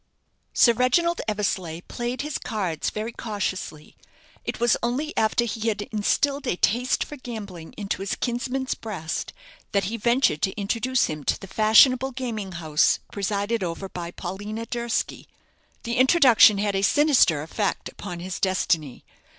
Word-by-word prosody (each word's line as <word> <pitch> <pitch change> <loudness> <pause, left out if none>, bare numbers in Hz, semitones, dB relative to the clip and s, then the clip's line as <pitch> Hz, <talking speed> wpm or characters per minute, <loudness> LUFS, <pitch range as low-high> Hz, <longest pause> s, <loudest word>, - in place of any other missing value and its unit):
Sir 235 - +5
Reginald 320 +9 +2
Eversleigh 190 -6 -2
played 240 +1 -4
his 300 -1 -3
cards 190 -9 -2
very 215 +2 -4
cautiously. 195 -9 -5 0.5
It - - -4
was 240 -1 +4
only 265 +7 -2
after 220 +2 +2
he 225 0 -3
had 210 -2 0
instilled 275 +7 0
a 215 - +1
taste 245 +8 +1
for 295 - -9
gambling 205 -10 -8
into 200 -2 -3
his 195 - -2
kinsman's 255 +2 -2
breast 185 -8 -5 0.4
that 200 -1 +2
he 225 +5 -3
ventured 235 - +2
to 190 +2 -1
introduce 235 +5 +1
him 150 -1 -5
to - - +1
the - - -9
fashionable 245 +6 +5
gaming 225 -7 -4
house 155 -2 +2
presided 205 +2 -1
over 175 +2 -4
by 175 -2 -6
Paulina 205 +6 -6
Durski. 235 -1 -3 0.6
The 235 0 -2
introduction 255 -6 +6
had 200 0 0
a 195 - +1
sinister 245 - +4
effect 200 +6 -2
upon 175 -4 -7
his 185 0 -5
destiny. 165 -7 0
215 Hz, 150 wpm, -24 LUFS, 190-245 Hz, 0.6 s, introduction